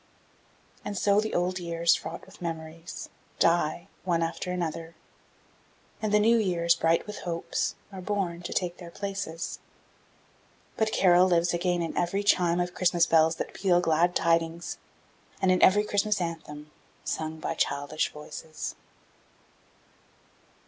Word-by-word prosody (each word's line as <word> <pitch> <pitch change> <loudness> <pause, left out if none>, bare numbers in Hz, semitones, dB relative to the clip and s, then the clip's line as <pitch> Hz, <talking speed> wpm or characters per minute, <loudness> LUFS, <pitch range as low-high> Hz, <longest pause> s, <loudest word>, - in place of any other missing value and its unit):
And 205 - -4
so 200 +2 +3
the 220 - -3
old 180 +1 0
years, 170 -1 +2
fraught - - -5
with - - -17
memories, 165 0 -6 0.3
die, 170 +1 +2 0.2
one 170 -2 +1
after 165 +2 -3
another, 165 -2 -4 1.1
and 215 -1 -1
the 210 - +5
new 230 +2 +5
years, 175 -5 +2
bright 165 0 +1
with 210 0 -7
hopes, 170 -2 -2 0.2
are 190 -1 -7
born 180 -3 -2
to 175 - -6
take 175 -2 -1
their 175 -2 -9
places; 195 -3 -4 1.2
but 220 -1 +1
Carol 180 -2 +5
lives 175 -1 +2
again 175 0 0
in 165 - -4
every 185 +4 0
chime 180 -4 +3
of 180 0 -1
Christmas 175 -2 +3
bells 160 -1 +4
that - - -5
peal 180 -3 +3
glad 175 +1 +2
tidings 165 0 0 0.6
and 190 -1 +3
in 185 - +2
every 205 +2 +6
Christmas 210 0 +1
anthem 155 -3 -5 0.3
sung 160 0 -3
by 160 - -2
childish 145 -1 -1
voices. 150 +1 -7
175 Hz, 140 wpm, -28 LUFS, 165-185 Hz, 1.2 s, every